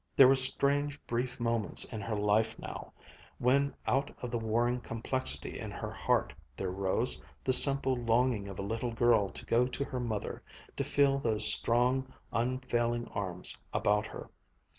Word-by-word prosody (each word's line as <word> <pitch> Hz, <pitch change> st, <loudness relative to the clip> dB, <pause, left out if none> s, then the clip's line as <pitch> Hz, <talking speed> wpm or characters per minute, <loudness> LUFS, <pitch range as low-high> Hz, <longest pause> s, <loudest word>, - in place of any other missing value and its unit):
There 135 Hz, -, +8 dB
were 135 Hz, -, +6 dB
strange, 140 Hz, +2 st, +4 dB
brief 125 Hz, +2 st, -3 dB
moments 115 Hz, -3 st, +2 dB
in 110 Hz, -3 st, -7 dB
her 110 Hz, +2 st, -3 dB
life 105 Hz, +2 st, +1 dB
now, -, -, -8 dB, 0.5 s
when 140 Hz, +3 st, +1 dB
out 140 Hz, +2 st, 0 dB
of 125 Hz, -, -4 dB
the 120 Hz, -, -2 dB
warring 120 Hz, +2 st, 0 dB
complexity 120 Hz, +3 st, -2 dB
in -, -, -6 dB
her -, -, -6 dB
heart -, -, -1 dB, 0.2 s
there 95 Hz, -1 st, -3 dB
rose 100 Hz, +6 st, 0 dB, 0.2 s
the 130 Hz, -, +1 dB
simple 135 Hz, 0 st, +7 dB
longing 120 Hz, -3 st, 0 dB
of 95 Hz, -2 st, -8 dB
a -, -, -4 dB
little 115 Hz, +3 st, -3 dB
girl 115 Hz, -4 st, +2 dB
to -, -, -9 dB
go 120 Hz, +2 st, +2 dB
to 130 Hz, +2 st, -4 dB
her 130 Hz, -, -5 dB
mother, 110 Hz, -4 st, -4 dB, 0.3 s
to -, -, -2 dB
feel 140 Hz, -1 st, +2 dB
those 110 Hz, -4 st, +1 dB
strong, 125 Hz, +3 st, 0 dB, 0.2 s
unfailing 120 Hz, -1 st, -1 dB
arms 90 Hz, -3 st, -4 dB, 0.2 s
about 105 Hz, +1 st, +1 dB
her. -, -, -10 dB
120 Hz, 160 wpm, -31 LUFS, 110-130 Hz, 0.5 s, There